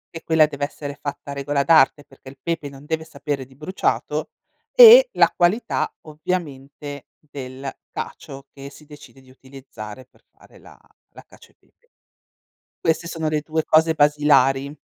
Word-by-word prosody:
E 165 - -7
quella 160 -1 +4
dev'essere 145 0 -6
fatta 145 -1 -6
a - - -4
regola 140 0 -1
d'arte, 145 -2 +4
perché 135 -1 -15
il 135 - -15
pepe 155 0 -4
non 140 +1 -14
deve 160 +1 -3
sapere 145 -3 -5
di 130 +1 -21
bruciato 155 +7 -2 0.4
e - - +9
la - - +3
qualità, 180 +7 0
ovviamente, 145 -3 -6
del 135 -2 -9 0.2
cacio 135 0 -8
che 140 0 -10
si 145 +2 -17
decide 145 -2 -15
di 130 -1 -20
utilizzare 130 -3 -12
per - - -31
fare - - -21
la - - -17 0.4
la - - -13
cacio - - -19
e - - -37
pepe. 480 - -37 0.9
Queste 165 +1 -1
sono 160 -2 -3
le 155 0 -1
2 155 +1 -3
cose 160 +1 +3
basilari. 145 -2 +2
145 Hz, 155 wpm, -21 LUFS, 135-160 Hz, 0.9 s, e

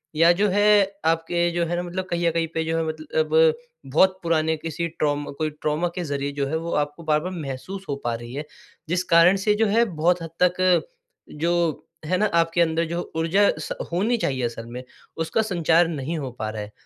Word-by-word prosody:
या 165 +2 +6
जो 200 +4 +2
है 205 +2 +2 0.4
आपके 165 +1 +1
जो 170 0 0
है 170 +1 -2
ना 175 - -1
मतलब 180 +1 -4
कहीं 170 0 0
न - - +3
कहीं 165 0 0
पे 160 - 0
जो 165 0 -1
है 165 - +1
मतल 155 0 -3
अब 160 0 +4 0.3
बहुत 185 +8 +3
पुराने 160 -1 +1
किसी 165 +2 -3
ट्रॉमा 145 -3 -2
कोई 155 -1 -1
ट्रॉमा 155 +3 0
के 180 - -3
ज़रिए 140 -2 -3
जो 140 -1 -1
है 160 +3 -1
वो 165 +1 -5
आपको 145 +3 -10
बार-बार 155 +3 0
महसूस 175 +4 -6
हो 140 - 0
पा 120 - 0
रही 120 +1 -9
है। 145 +3 -4 0.4
जिस 180 +2 +1
कारण 170 +3 +7
से 210 -1 +4
जो 225 +1 +2
है 225 +3 +3
बहुत 175 -2 +1
हद 165 - -6
तक 180 0 +3 0.6
जो 170 +1 +2 0.5
है 185 +4 +1
ना 215 - +2 0.2
आपके 165 +1 0
अंदर 165 0 +2
जो 170 +2 -4
ऊर्जा 175 +5 +3
स 155 - -6 0.2
होनी 210 +8 +1
चाहिए 130 - -1
असल 115 -1 -5
में, 120 +2 -8 0.3
उसका 165 +7 0
संचार 175 -5 +2
नहीं 160 0 -3
हो 135 -4 -4
पा 110 -3 -5
रहा 110 0 -5
है। 105 - -10
165 Hz, 215 wpm, -24 LUFS, 150-175 Hz, 0.6 s, कारण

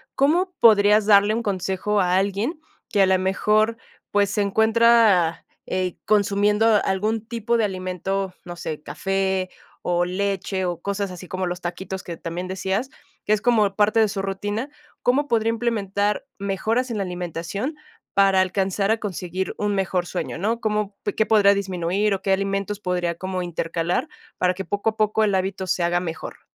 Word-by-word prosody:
¿cómo 345 +7 +2
podrías 210 -1 +6
darle 205 0 +5
un 230 +1 -1
consejo 195 +1 0
a 180 0 +2
alguien 200 - -1 0.3
que 205 - +2
a - - +7
la 190 0 +3
mejor, 210 +4 +1 0.3
pues, 205 -1 +2
se 205 +1 0
encuentra, 220 -4 +4 0.2
eh, 185 -1 -1
consumiendo 205 +1 +2 0.2
algún 215 +3 -1
tipo 235 0 0
de 225 - +2
alimento, 190 0 -3
no 175 -1 -7
sé, 160 -3 -5
café 190 +4 -1 0.3
o 175 0 +1
leche, 190 +1 -2
o 175 -2 -3
cosas 200 +1 -2
así 180 0 -9
como 185 +1 -3
los 175 0 -4
taquitos?, 185 +2 -5
que 170 - -6
también 175 +2 -5
decías, 190 +6 -2 0.4
que 215 - +3
es 215 - +1
como 215 -5 +2
parte 215 +2 +3
de 220 - +4
su 195 -1 -3
rutina, 205 +6 -3 0.3
¿cómo 275 +4 +2
podría 225 -3 +1
implementar 210 -3 -1
mejoras, 215 +6 -1
en 225 - -2
la 200 - 0
alimentación, 180 - -4 0.4
para 195 -1 +4
alcanzar 195 +1 0
a 225 - +2
conseguir 185 -2 -4
un 205 -1 0
mejor 185 -2 0
sueño?, 180 - -4
¿no? 220 +6 -1
¿Cómo 210 -2 -1 0.2
qué 220 - +3
podría 205 -2 +5
disminuir, 195 +1 0
o 195 - -3
qué 195 - 0
alimentos 195 +1 -1
podría 180 -3 -1
como 185 +1 -4
intercalar, 170 0 -2 0.3
para 180 0 +2
que 195 +1 -5
poco 205 +2 0
a 220 - -21
poco 215 0 +2
el 200 -2 +1
hábito 190 0 -2
se 180 - 0
haga 175 +1 +2
mejor? 165 -2 -7
195 Hz, 170 wpm, -23 LUFS, 185-215 Hz, 0.4 s, a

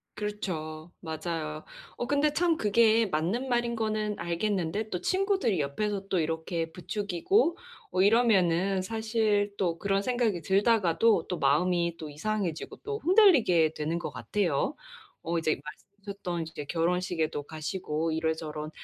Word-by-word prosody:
그렇죠. 170 -6 -5
맞아요. 160 -1 -4 0.3
어, 240 - -2
근데 290 +1 +2
참 340 -1 +2
그게 225 +1 +4
맞는 185 +11 -1
말인 240 -1 +1
거는 215 -1 -1
알겠는데 195 +3 -1
또 180 - -3
친구들이 380 - +1
옆에서 195 +7 -2
또 185 - +1
이렇게 165 +1 -2
부추기고 205 - 0 0.3
어 185 +1 +1
이러면은 195 -4 +3
사실 220 -1 0
또 170 -3 0
그런 195 0 +1
생각이 235 -7 0
들다가도 200 -1 +3
또 180 -3 -3
마음이 170 +4 +2
또 155 -2 -7
이상해지고 180 +1 -3
또 430 0 -3
흔들리게 275 - +5
되는 155 +2 -2
것 155 - -5
같아요. 170 - -1 0.5
어, 170 +1 -1
이제 155 -1 0
말씀하셨던 195 +1 -7
이제 150 -3 -7
결혼식에도 165 -2 -1
가시고 160 +1 -3
이런저런 160 -1 -2
185 Hz, 310 characters per minute, -28 LUFS, 160-215 Hz, 0.5 s, 흔들리게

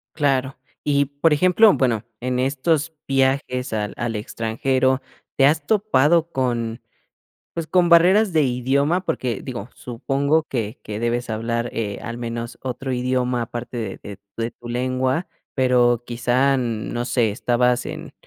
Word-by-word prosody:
Claro. 135 -3 0 0.3
Y 140 -1 +3
por 145 +3 +1
ejemplo, 185 +7 +5
bueno 120 -4 +1 0.2
en 125 0 -1
estos 145 +4 0
viajes 135 -2 0
al 105 -1 -2
al 120 -2 -2
extranjero, 130 +5 0 0.4
¿te 135 - +5
has 150 0 +2
topado 170 -6 +3
con 120 -3 -1 0.7
pues 165 -2 -3
con 180 0 +3
barreras 185 +4 +5
de 155 -2 +3
idioma? 140 +8 +1
Porque 125 - -2
digo, 120 -3 -6
supongo 140 +6 0
que 115 -2 -3
que 105 0 -5
debes 120 0 -1
hablar, 115 +2 -2
eh, 105 -3 -3
al 120 0 -5
menos 115 0 -5
otro 130 +1 -4
idioma 125 -1 0
aparte 120 +2 -6
de 110 -5 -4
de 100 -1 -9 0.2
de 115 +1 -2
tu 120 0 -12
lengua, 130 +5 -1 0.3
pero 125 -2 +3
quizá, 125 +3 +2
no 120 -1 -2
sé, 120 -4 +1
estabas 125 +2 +1
en - - -7
125 Hz, 145 wpm, -22 LUFS, 120-140 Hz, 0.7 s, ejemplo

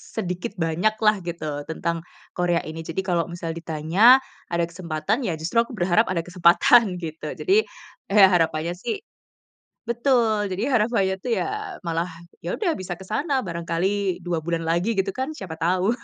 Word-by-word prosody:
sedikit 180 -5 -3
banyak 170 +7 +1
lah 210 0 +6
gitu, 170 -1 -5 0.3
tentang 170 +1 -2 0.4
Korea 175 -1 +2
ini. 160 +1 -7
Jadi 165 - -1
kalo 175 -2 +2
misal 170 -1 -4
ditanya, 160 +1 -4 0.5
ada 170 0 +1
kesempatan, 170 +3 -2
ya - - 0
justru 165 +8 -2
aku 235 +2 -6
berharap 185 +5 +3
ada 170 -3 -1
kesempatan 180 +4 +5
gitu, 160 -1 -6
jadi, 385 - +1 0.6
eh, 200 -2 +8
harapannya 165 0 +1
sih 240 - -1 0.9
betul, 235 -5 +2
jadi 190 +3 -2
harapannya 210 -4 +2
tuh 245 - -2
ya - - 0 0.4
malah, 165 +1 0 0.4
yaudah 370 -6 -1
bisa 185 -1 -5
ke - - -9
sana 275 - 0
barangkali 175 +3 -1
2 175 -2 -1
bulan 170 -1 -1
lagi 175 +6 +1
gitu 195 0 0
kan, 265 +4 -2
siapa 190 - -7
tau 185 +6 +2
180 Hz, 155 wpm, -24 LUFS, 170-215 Hz, 0.9 s, eh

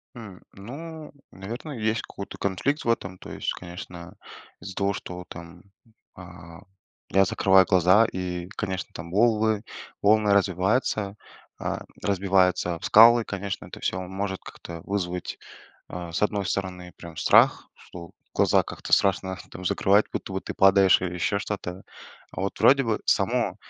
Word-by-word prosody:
М, 105 -6 -10
ну, 150 +9 -9 0.2
наверное, 120 - -7
есть 110 +1 0
какой-то 100 - -9
конфликт 130 - -1
в - - -2
этом, 95 -5 -1
то - - -10
есть, - - -3
конечно, 85 -1 -10 0.4
из-за 95 - -9
того, 100 0 0
что 90 -1 -7
там, 85 +1 -11 0.5
а, 85 0 -12 0.5
я 95 +1 +4
закрываю 95 0 +4
глаза 95 +5 +5
и 90 -3 -4
конечно 95 -1 -4
там 85 +1 -8
волы 110 0 +2 0.4
волны 105 0 +4
развиваются, 100 +2 +1 0.4
а, - - -3 0.2
разбиваются 95 -3 +2
об 80 - -12
скалы, 115 +2 +7
конечно, 100 -1 -5
это - - -10
всё 95 - -1
может 95 +1 -4
как-то 85 -1 -10
вызвать, 90 -3 -3 0.5
а, 85 -2 -7
с - - -2
одной 105 -1 +1
стороны 90 -1 -4
прям 85 -2 -11
страх, - - +4
что 85 -1 -12 0.2
глаза - - +3
как-то - - -8
страшно 95 -1 +2
там 90 - -9
закрывать, 100 +3 +3
будто - - -5
бы 95 - -1
ты - - -6
падаешь 95 0 +5
или 90 -1 -3
еще 95 +3 0
что-то. 100 -3 -5 0.5
А - - -7
вот 100 +1 -3
вроде 135 0 +5
бы 110 -2 -1
само, - - +1
95 Hz, 150 wpm, -25 LUFS, 90-105 Hz, 0.5 s, скалы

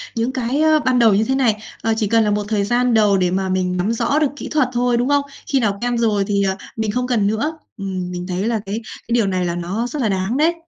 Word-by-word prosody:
những 230 +2 0
cái, 260 +2 -1
ờ, 315 0 +4
ban 255 -3 +1
đầu 225 -3 +5
như 205 +2 +3
thế 265 +4 0
này. 250 -6 +2 0.3
Ờ, 225 - +1
chỉ 215 - 0
cần 225 +2 +3
là 210 - +1
một 205 0 0
thời 210 -2 0
gian 245 +3 +1
đầu 210 -3 +4
để 180 -1 +1
mà 190 +1 -1
mình 185 -1 0
nắm 185 +5 0
rõ 285 +5 +1
được 305 - +3
kỹ - - -7
thuật 295 -5 +2
thôi, 245 0 +1
đúng 245 +3 0
không? 285 0 +3 0.3
Khi 275 - +2
nào 205 -5 0
quen 245 0 0
rồi 215 -4 +2
thì, 200 -1 +1
ờ, 190 0 0 0.2
mình 220 -2 -1
không 250 +3 -1
cần 225 -5 +1
nữa. 230 +10 -1 0.2
Ừm, 185 -3 -4
mình 180 0 -5
thấy 185 +1 -2
là 230 -2 0
cái 200 +2 -3 0.3
cái 235 - -2
điều 225 -4 +2
này 185 -1 0
là 170 -1 -2
nó 185 +7 -2
rất 280 +3 -4
là 225 - +1
đáng 195 +5 -1
đấy. 320 +3 +3
220 Hz, 285 wpm, -19 LUFS, 195-245 Hz, 0.3 s, đầu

